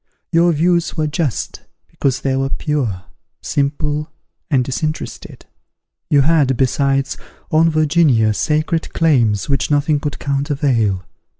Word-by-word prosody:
Your 170 +1 +4
views 170 +2 +1
were 155 - +1
just, 150 -4 -2 0.3
because 135 -2 -1
they 135 -1 0
were 135 0 0
pure, 130 -12 -2 0.4
simple, 150 +2 -2 0.4
and 130 -5 +2
disinterested. 155 +4 -5 0.6
You 145 -2 +4
had, 140 -4 +2
besides, 135 +1 +1 0.3
on 160 +1 +4
Virginia, 150 -8 +3
sacred 155 +6 -1
claims 120 - +2
which 140 -6 0
nothing 145 0 +2
could 145 -1 -4
countervail. 135 -8 0
145 Hz, 115 wpm, -18 LUFS, 135-155 Hz, 0.6 s, Your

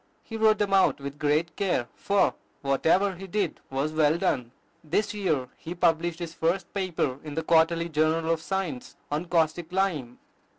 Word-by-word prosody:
He 225 - -8
wrote 220 -1 +4
them 200 -2 0
out 190 -6 +4
with 140 +1 -7
great 155 +3 +1
care; 180 - 0
for 200 0 +2 0.3
whatever 165 +8 +2
he 190 +2 -9
did 195 -3 -1
was 140 +3 -1
well 155 0 +3
done. 125 -7 -1 0.3
This 175 +8 0
year 160 -11 -1
he 170 +2 -7
published 165 0 +1
his 170 -2 -6
first 170 +2 -1
paper 170 -9 -1
in 150 -2 -7
the 160 - -1
"Quarterly 165 +1 +3
Journal 160 +1 +1
of 165 -1 0
Science" 175 -8 -3 0.2
on 150 +4 -1
caustic 165 0 0
lime. 170 -11 -1
165 Hz, 170 wpm, -27 LUFS, 150-190 Hz, 0.3 s, wrote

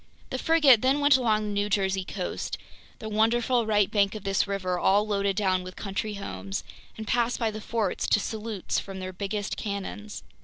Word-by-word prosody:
The 260 - -2
frigate 295 -8 +5
then 265 +3 +3
went 285 -1 +6
along 220 -4 +2
the 210 - -3
New 205 0 0
Jersey 190 -1 +1
coast—the 200 +3 -6
wonderful 230 +2 +2
right 205 -2 +3
bank 200 -1 +2
of 210 - -6
this 195 0 +1
river, 185 -3 -1
all 200 +3 +3
loaded 200 -2 0
down 190 -2 +1
with 185 0 -9
country 205 +1 -3
homes—and 200 +2 -7
passed 240 +1 +1
by 225 -2 0
the 215 0 -7
forts 220 -3 -1
to - - +4
salutes 215 -2 -3
from 195 -1 -7
their 185 0 -5
biggest 200 +2 -3
cannons. 205 0 -5
210 Hz, 180 wpm, -27 LUFS, 195-225 Hz, -, went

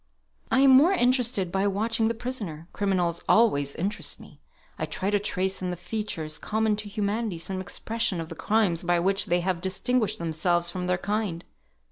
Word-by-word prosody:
"I - - +3
am 275 -1 +7
more 295 +9 +7
interested 245 - +2
by 195 +2 +1
watching 220 +3 0
the 230 - -1
prisoner. 210 -10 -5
Criminals 180 -4 0
always 145 -12 +3
interest 190 -3 -3
me. 145 - -15 0.4
I 155 - -2
try 190 +5 -2
to 205 - +3
trace 190 -1 -1
in 180 - -2
the 180 - -2
features 175 -4 -4
common 220 0 0
to 210 0 -5
humanity 205 -1 -2
some 185 +3 -3
expression 220 -1 -2
of 165 -1 -5
the 165 - -7
crimes 205 -3 +1
by 175 0 +1
which 195 +3 +1
they 175 +1 +2
have 180 -1 -1
distinguished 215 +5 0
themselves 170 +1 0
from 180 -1 -4
their 180 0 +1
kind. 200 -3 -2
195 Hz, 180 wpm, -26 LUFS, 175-220 Hz, 0.4 s, am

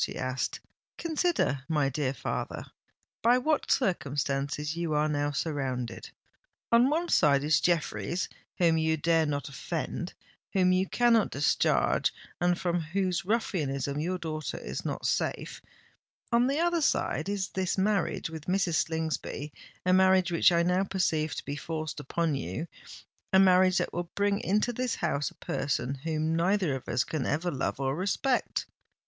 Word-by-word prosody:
she - - -3
asked. 130 +1 -2 0.4
"Consider, 325 - 0
my 150 -3 +2
dear 135 -1 -1
father, 135 - -4 0.6
by 240 +2 +5
what 300 +4 0
circumstances 145 - 0
you 170 -2 -1
are 150 +1 +2
now 145 -1 0
surrounded. 135 -5 -3 0.6
On 235 +3 +6
one 330 +4 0
side 140 - +4
is 150 0 +3
Jeffreys 175 +1 0 0.3
whom 165 -2 +3
you 160 0 +1
dare 160 +1 +2
not 145 -1 -2
offend—whom 185 +6 -3
you 185 +1 +2
cannot 235 -3 +3
discharge—and 175 +4 +1
from 175 -1 0
whose 180 +2 -1
ruffianism 145 - -1
your 180 +4 -1
daughter 155 -3 -4
is - - -5
not - - -4
safe. - - -1 0.7
On 235 +1 +4
the 275 +2 0
other 345 0 +2
side, 185 - 0
is 195 -2 -2
this 190 0 -1
marriage 195 -1 +1
with 160 -2 -8
Mrs. 180 -3 +2
Slingsby—a 160 +2 -3
marriage 185 -1 +4
which 170 +1 +5
I 170 0 +3
now 180 +2 +2
perceive 165 -5 0
to - - -6
be 145 - -3
forced 155 +1 -4
upon 165 +3 -1
you—a 145 - -4
marriage 185 -1 +5
that - - -1
will 175 0 -3
bring 200 0 +1
into 210 +5 +1
this 250 0 -1
house 145 -4 -1
a - - -20
person 135 -2 -2
whom 155 +3 -1
neither 180 -1 +2
of 130 - -6
us 125 - +2
can 150 -2 -3
ever 170 +4 0
love 135 -1 -2
or 135 0 0
respect!" 205 - 0
170 Hz, 150 wpm, -29 LUFS, 145-190 Hz, 0.7 s, On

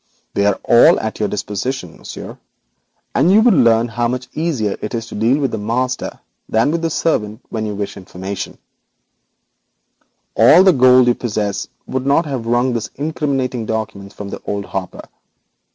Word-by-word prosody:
They 100 0 +2
are 100 - +1
all 120 - +6
at 110 0 -4
your 105 - 0
disposition, 105 -2 -4
Monsieur, - - -9 0.7
and 150 +6 +3
thus 195 - +5
you 215 - +7
learn 120 - +4
how 120 +1 0
much 125 +1 -4
easier 145 -11 -1
it 105 - -4
is 115 -1 -3
to - - -9
deal 115 +6 +2
with 135 -4 -1
the 110 - -3
master 125 +4 -2 0.3
than 115 +6 +2
with 165 0 -1
the 165 - 0
servant. 110 -9 -1 2.9
All 180 +4 +7
the 190 -1 +6
gold 130 -1 +6
you 120 - +4
possess 105 -4 -3 0.2
would 130 0 -3
not 145 +4 +3
have 130 -6 -4
wrung 120 +2 +2
these 115 -2 -3
incriminating 135 -5 -2
documents 110 -3 -4
from 100 -1 -7
old 100 -1 -2
Hopper. 95 -2 -5
120 Hz, 150 wpm, -18 LUFS, 110-135 Hz, 2.9 s, you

